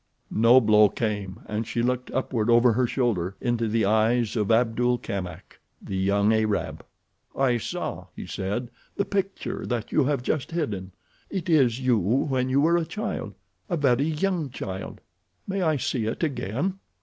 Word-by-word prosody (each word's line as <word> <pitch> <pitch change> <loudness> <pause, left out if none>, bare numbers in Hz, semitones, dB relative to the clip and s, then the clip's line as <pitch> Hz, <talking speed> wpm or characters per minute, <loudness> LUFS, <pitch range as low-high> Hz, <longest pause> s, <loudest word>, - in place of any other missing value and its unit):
No 115 +3 +6
blow 105 -3 +5
came 105 -4 -3
and 110 +1 -3
she 120 - -1
looked 125 +1 -1
upward 120 -4 -1
over 120 0 +5
her 125 +2 +2
shoulder—into 115 0 -1
the 110 0 +1
eyes 110 +3 +2
of 105 -3 0
Abdul 120 +1 +2
Kamak, 95 -6 -6 0.2
the 95 - -6
young 100 +3 +2
Arab. 110 -2 -1 0.5
"I 125 -3 +2
saw," - - -4
he - - -7
said, 110 +6 -3 0.2
"the 200 - 0
picture 195 0 -3
that 120 -3 -3
you 150 - +3
have 140 -3 0
just 135 0 -1
hidden. 100 - -3 0.4
It 185 -3 -4
is 130 -6 +4
you 125 -3 +3
when 130 - +1
you 135 +2 +3
were 170 +3 +4
a 170 - +1
child—a 180 0 -5
very 135 -2 +3
young 160 0 -1
child. 95 -6 -6 0.4
May 195 0 -2
I 160 -4 +2
see 120 -3 -1
it 115 - -3
again?" 140 - -2
120 Hz, 160 wpm, -25 LUFS, 110-140 Hz, 0.5 s, No